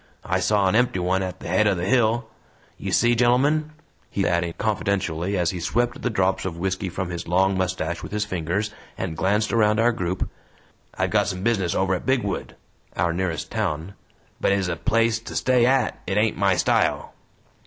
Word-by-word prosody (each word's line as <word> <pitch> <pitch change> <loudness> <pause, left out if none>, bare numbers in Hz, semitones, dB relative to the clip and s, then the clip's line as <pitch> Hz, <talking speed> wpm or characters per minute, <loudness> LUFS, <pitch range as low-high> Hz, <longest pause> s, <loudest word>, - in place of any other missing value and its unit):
I - - 0
saw 105 -2 +2
an 95 - +2
empty 120 -3 +2
one 90 +1 +1
at 95 -1 -5
the - - -7
head 95 +5 +3
o' 100 - +3
the 85 0 -3
hill. 115 +1 +2 0.5
You - - -4
see, 120 0 +4
gennelmen," 135 +6 +3 0.4
he - - -1
added 85 -1 0
confidentially 100 -3 -1
as 85 -2 +1
he 90 - -5
swept 120 +8 -1
the 125 - 0
drops 95 -3 +1
of 90 -3 -4
whisky 95 +1 -2
from 90 0 -4
his 85 - -5
long 95 +3 +2
mustache 90 -2 -2
with - - -8
his 105 0 -1
fingers 95 +3 -2 0.3
and 85 -4 -3
glanced 105 +5 +1
around 105 -1 +3
our 120 +1 +4
group, 90 -4 -2 0.7
"I've - - 0
got - - +2
some 95 -2 -3
business 100 -7 +1
over 95 0 +1
at 90 - -4
Bigwood," 125 -7 -1 0.4
our 85 -1 +1
nearest 85 -2 -3
town, 95 -5 -2 0.5
"but - - +2
ez 100 -2 +1
a 85 - -1
place 115 +5 +1
to 115 - -9
stay 125 -2 +3
AT 135 0 +1
it 95 - 0
ain't 110 +1 +2
my 100 -2 +2
style." - - +1
95 Hz, 195 wpm, -24 LUFS, 90-110 Hz, 0.7 s, see